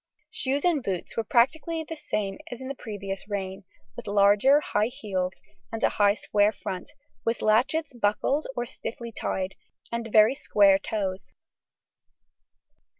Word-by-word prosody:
Shoes 285 -9 -1
and 335 -5 +3
boots 190 -7 -3
were 230 - 0
practically 315 +8 +2
the 325 - -5
same 200 -9 -3
as 245 - -6
in 260 0 -6
the - - -2
previous 200 -6 -6
reign, 195 -1 -4 0.3
with - - -9
larger 205 +7 +5
high 210 -7 0
heels 195 -8 -3 0.3
and 225 +1 -4
a - - +5
high 205 -1 +3
square 205 -1 +2
front, 185 -4 -6 0.3
with 230 0 -1
latchets 260 +8 +2
buckled 240 +6 0
or 240 - -1
stiffly 235 0 -7
tied, 190 -3 -3 0.4
and 235 -1 -3
very 215 +3 +6
square 200 -7 +4
toes. 195 -2 -4
215 Hz, 145 wpm, -27 LUFS, 200-260 Hz, 0.4 s, very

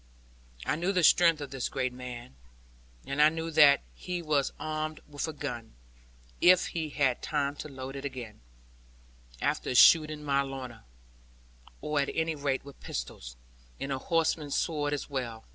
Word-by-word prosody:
I - - 0
knew 175 +4 0
the 180 -3 +1
strength 165 -1 +5
of 145 - -6
this 135 -2 -3
great 130 -2 -2
man; 125 - -8 0.7
and 140 +2 0
I 150 - +8
knew 165 +1 -4
that 150 -3 +6
he 180 -1 -5
was 150 -3 +1
armed 155 0 -3
with 145 +1 -4
a - - -3
gun 125 - -6 0.7
if 180 0 +6
he 160 -2 -3
had 135 -4 +1
time 145 -1 -1
to 150 - -7
load 135 0 -7
again, 130 - -7 1.0
after 125 - -1
shooting 155 +2 +6
my 140 -1 +2
Lorna 130 - -7 1.0
or 150 -1 -1
at 140 - 0
any 160 0 0
rate 140 -2 -2
with 140 - -12
pistols, - - -6 0.4
and 135 - -4
a 135 - -1
horseman's 160 -2 0
sword 150 -3 0
as 145 - -3
well. 120 -5 -5
145 Hz, 160 wpm, -29 LUFS, 130-155 Hz, 1.0 s, I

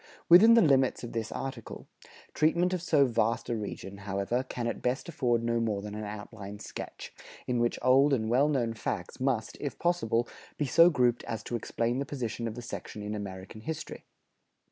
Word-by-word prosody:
Within 215 +7 +9
the 230 - +6
limits 135 -5 +3
of 120 - -6
this 115 -1 -3
article, 130 -4 -6 0.5
treatment 170 +4 +2
of 180 - -1
so 150 -5 +4
vast 115 -1 0
a 120 - 0
region, 100 -2 -6
however, 100 +4 -1
can 125 -2 -5
at 115 - -3
best 125 +6 -1
afford 125 -8 0
no 115 0 +1
more 105 -3 -1
than 105 0 -6
an 105 0 -5
outline 105 -1 -8
sketch, - - -8 0.3
in 125 -1 0
which 120 0 +1
old 135 +3 +5
and 110 -5 +1
well 130 +6 +3
known 120 -6 0
facts 95 -5 -4
must, 125 -5 -1
if 145 - -4
possible, 120 -10 +1 0.3
be 150 - 0
so 165 +6 +6
grouped 125 -6 +2
as 115 -2 -4
to 120 - -4
explain 120 +1 -1
the 140 - -2
position 120 -4 -3
of 110 - -5
the 120 - -7
section 105 -2 -7
in 105 +1 -4
American 100 0 -7
history. 155 +6 -6
120 Hz, 190 wpm, -29 LUFS, 110-135 Hz, 0.5 s, Within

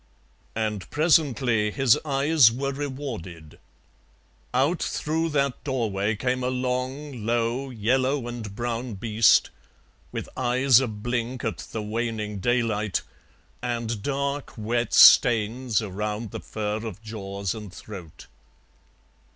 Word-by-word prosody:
And 105 -3 -2
presently 135 -8 +2
his 135 0 +4
eyes 140 -3 +4
were 135 +4 -2
rewarded: 130 - -6 0.9
out 140 +8 +1
through 160 +2 -1
that 140 -3 0
doorway 110 -6 -1
came 125 +3 -1
a - - 0
long, 130 +1 -3
low, 120 +4 0
yellow 130 +3 0
and 115 -4 -6
brown 120 0 -3
beast, 110 +1 +3 0.6
with - - -5
eyes 130 0 +4
a 130 - 0
blink 120 +3 -3
at - - -2
the 110 - -6
waning 105 -1 -3
daylight, 110 -2 0 0.6
and 120 -3 -3
dark 140 +2 -3
wet 120 +2 -1
stains 115 0 +6
around 105 +2 -4
the - - -5
fur 105 -1 -3
of 110 -1 -7
jaws 100 -3 -4
and 105 -4 -8
throat. 95 -5 -10
120 Hz, 115 wpm, -25 LUFS, 105-130 Hz, 0.9 s, stains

